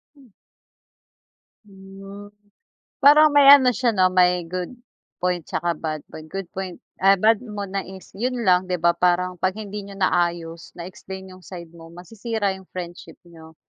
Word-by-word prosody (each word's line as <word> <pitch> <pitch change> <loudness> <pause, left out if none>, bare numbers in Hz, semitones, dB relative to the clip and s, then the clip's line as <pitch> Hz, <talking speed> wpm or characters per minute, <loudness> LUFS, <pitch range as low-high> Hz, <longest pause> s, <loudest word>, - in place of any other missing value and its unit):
Hmm. 270 -3 -20 1.4
Hmm, 195 +1 -12 0.7
parang 295 +1 +7
may 280 -1 +7
ano 260 -3 +8
siya, 245 +1 0
'no, 185 -4 +2
may 180 -1 +3
good 180 +7 -6 0.4
point 180 -1 -1
'tsaka 175 0 -1
bad 155 -1 -5
point, 155 0 -12
good 195 +3 -5
point, 190 -2 -6 0.2
ah, 195 +1 +5
ba't 220 +3 +3
mo 210 -4 -6
na 195 0 -3
is 190 0 -13
'yon 240 +3 -3
lang, 185 0 +3
'di 180 - 0
ba, 170 +1 +2
parang 180 0 0
'pag 185 +2 0
hindi 210 -1 -6
niyo 200 0 -11
naayos, 170 -3 -1
na 170 - -7
explain 190 0 -10
'yong 185 - -15
side 170 -2 -11
mo 165 -1 -13
masisira 205 +3 -4
'yong 190 -1 -14
friendship 175 -1 -9
niyo. 160 -2 -15
190 Hz, 165 wpm, -22 LUFS, 175-205 Hz, 1.4 s, ano